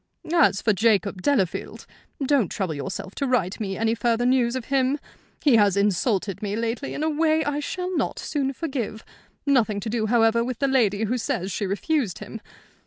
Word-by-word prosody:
"As 310 Hz, -, +4 dB
for 220 Hz, -, +3 dB
Jacob 200 Hz, -2 st, +1 dB
Delafield, 200 Hz, -8 st, -1 dB, 0.4 s
don't 260 Hz, -, +2 dB
trouble 185 Hz, -5 st, -2 dB
yourself 155 Hz, +6 st, -5 dB
to 275 Hz, -, -2 dB
write 205 Hz, -8 st, 0 dB
me 195 Hz, -3 st, -3 dB
any 225 Hz, 0 st, +1 dB
further 235 Hz, 0 st, +1 dB
news 250 Hz, -1 st, +2 dB
of 255 Hz, -3 st, -4 dB
him. 270 Hz, +1 st, +1 dB, 0.5 s
He 275 Hz, -6 st, +5 dB
has 200 Hz, -2 st, +3 dB
insulted 200 Hz, -1 st, 0 dB
me 205 Hz, -1 st, -2 dB
lately 230 Hz, +4 st, -3 dB
in 300 Hz, -, -3 dB
a -, -, +1 dB
way 315 Hz, +1 st, +2 dB
I 290 Hz, 0 st, -1 dB
shall 365 Hz, +5 st, -3 dB
not -, -, -1 dB
soon 275 Hz, -3 st, -2 dB
forgive 260 Hz, -8 st, -4 dB, 0.4 s
nothing 235 Hz, -7 st, +2 dB
to 220 Hz, -, -4 dB
do, 220 Hz, -2 st, 0 dB
however, 230 Hz, 0 st, +3 dB
with 250 Hz, -1 st, -3 dB
the 275 Hz, -, +1 dB
lady 225 Hz, -6 st, +2 dB
who 245 Hz, +4 st, 0 dB
says 190 Hz, -3 st, -2 dB
she 200 Hz, +3 st, -2 dB
refused 215 Hz, -, -1 dB
him. 210 Hz, +1 st, -8 dB
230 Hz, 185 wpm, -24 LUFS, 205-270 Hz, 0.5 s, He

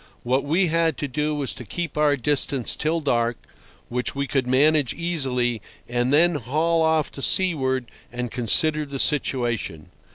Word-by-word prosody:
What 130 Hz, +2 st, 0 dB
we 165 Hz, +6 st, +2 dB
had 165 Hz, 0 st, +1 dB
to 145 Hz, -, -3 dB
do 150 Hz, +3 st, -2 dB
was 140 Hz, -3 st, -2 dB
to -, -, -9 dB
keep 165 Hz, -, -5 dB
our 150 Hz, -1 st, +3 dB
distance 140 Hz, -1 st, 0 dB
till 160 Hz, +2 st, -1 dB
dark, 120 Hz, -4 st, 0 dB, 0.5 s
which 125 Hz, +2 st, -2 dB
we 140 Hz, 0 st, -1 dB
could 135 Hz, -2 st, -1 dB
manage 145 Hz, +1 st, +2 dB
easily, 130 Hz, -, -1 dB, 0.3 s
and 120 Hz, +1 st, -1 dB
then 170 Hz, +4 st, +4 dB
haul 155 Hz, +5 st, 0 dB
off 160 Hz, -2 st, +1 dB
to 140 Hz, -, -8 dB
seaward 130 Hz, -8 st, +1 dB, 0.3 s
and 125 Hz, -1 st, -5 dB
consider 150 Hz, +6 st, +3 dB
the 140 Hz, 0 st, -6 dB
situation. 120 Hz, -, 0 dB
140 Hz, 160 wpm, -23 LUFS, 125-155 Hz, 0.5 s, then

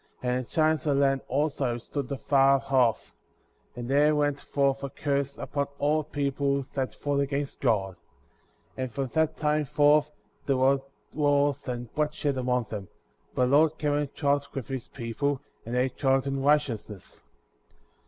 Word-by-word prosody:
And 125 Hz, 0 st, 0 dB
the -, -, -17 dB
giants 155 Hz, -2 st, +1 dB
of 145 Hz, -, +3 dB
the 140 Hz, -, +2 dB
land, 135 Hz, -1 st, +2 dB
also, 140 Hz, -3 st, 0 dB
stood 135 Hz, +3 st, -5 dB
afar 135 Hz, 0 st, +3 dB
off; 120 Hz, -, +2 dB, 0.6 s
and 120 Hz, -1 st, -6 dB
there 145 Hz, +3 st, +4 dB
went 145 Hz, -1 st, 0 dB
forth 140 Hz, -1 st, 0 dB
a 140 Hz, -, -3 dB
curse 140 Hz, -1 st, -2 dB
upon 140 Hz, -1 st, -2 dB
all 150 Hz, +2 st, +1 dB
people 140 Hz, -1 st, -1 dB
that 130 Hz, -2 st, -2 dB
fought 145 Hz, -1 st, -1 dB
against 140 Hz, 0 st, -2 dB
God; 100 Hz, -7 st, +1 dB, 0.7 s
16. -, -, -37 dB
And 130 Hz, -, -4 dB
from 135 Hz, +2 st, -2 dB
that 160 Hz, +1 st, 0 dB
time 150 Hz, 0 st, +1 dB
forth 150 Hz, +2 st, +4 dB, 0.4 s
there 135 Hz, -2 st, +2 dB
were 135 Hz, +1 st, +3 dB, 0.3 s
war^i 145 Hz, -1 st, +1 dB
and 120 Hz, -2 st, -5 dB
bloodshed 150 Hz, -2 st, -1 dB
among 125 Hz, -1 st, +1 dB
them; 100 Hz, -4 st, -5 dB, 0.5 s
but 125 Hz, -, +3 dB
the 125 Hz, -, 0 dB
Lord 155 Hz, +2 st, +4 dB
cam« 145 Hz, -1 st, 0 dB
and 145 Hz, -1 st, -1 dB
dwelt 140 Hz, -1 st, 0 dB
with 135 Hz, 0 st, -5 dB
his 130 Hz, -3 st, -4 dB
people,"' 135 Hz, +3 st, -2 dB, 0.3 s
and 120 Hz, -, -3 dB
they 125 Hz, +1 st, +2 dB
dwelt 135 Hz, +1 st, +1 dB
m 135 Hz, 0 st, -2 dB
righteousness. 135 Hz, -, -1 dB
140 Hz, 165 wpm, -27 LUFS, 130-145 Hz, 0.7 s, there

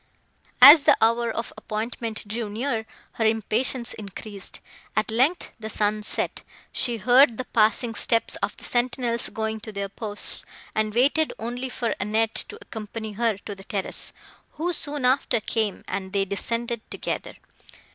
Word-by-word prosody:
As 290 Hz, +4 st, +12 dB
the -, -, +5 dB
hour 230 Hz, +1 st, +3 dB
of 225 Hz, +1 st, -4 dB
appointment 220 Hz, 0 st, -4 dB
drew 220 Hz, 0 st, -3 dB
near, 225 Hz, 0 st, -2 dB, 0.2 s
her 225 Hz, -, -3 dB
impatience 225 Hz, +3 st, 0 dB
increased. 200 Hz, -1 st, -7 dB, 0.4 s
At 215 Hz, +1 st, +1 dB
length, 265 Hz, +10 st, +1 dB
the 220 Hz, 0 st, -6 dB
sun 210 Hz, 0 st, 0 dB
set; 210 Hz, -, 0 dB, 0.3 s
she 240 Hz, -2 st, -1 dB
heard 245 Hz, +2 st, +5 dB
the 255 Hz, -, -4 dB
passing 225 Hz, +1 st, +2 dB
steps 230 Hz, 0 st, +2 dB
of -, -, -3 dB
the -, -, -12 dB
sentinels 240 Hz, -1 st, +1 dB
going 220 Hz, 0 st, -3 dB
to 215 Hz, 0 st, -8 dB
their 200 Hz, -1 st, -4 dB
posts; 210 Hz, 0 st, 0 dB, 0.3 s
and 215 Hz, 0 st, -1 dB
waited 285 Hz, +6 st, +3 dB
only 245 Hz, +3 st, -4 dB
for 240 Hz, -2 st, -2 dB
Annette 215 Hz, +2 st, +2 dB
to -, -, -8 dB
accompany 220 Hz, 0 st, -7 dB
her 220 Hz, 0 st, 0 dB
to 205 Hz, -, -5 dB
the 195 Hz, -1 st, -12 dB
terrace, 195 Hz, -2 st, -3 dB, 0.4 s
who, 345 Hz, +4 st, -2 dB
soon 290 Hz, -4 st, -3 dB
after, 255 Hz, -2 st, +2 dB
came, 215 Hz, -1 st, -2 dB
and 190 Hz, 0 st, -4 dB
they 195 Hz, -1 st, +1 dB
descended 230 Hz, +4 st, -2 dB
together. -, -, -4 dB
225 Hz, 155 wpm, -25 LUFS, 215-245 Hz, 0.4 s, As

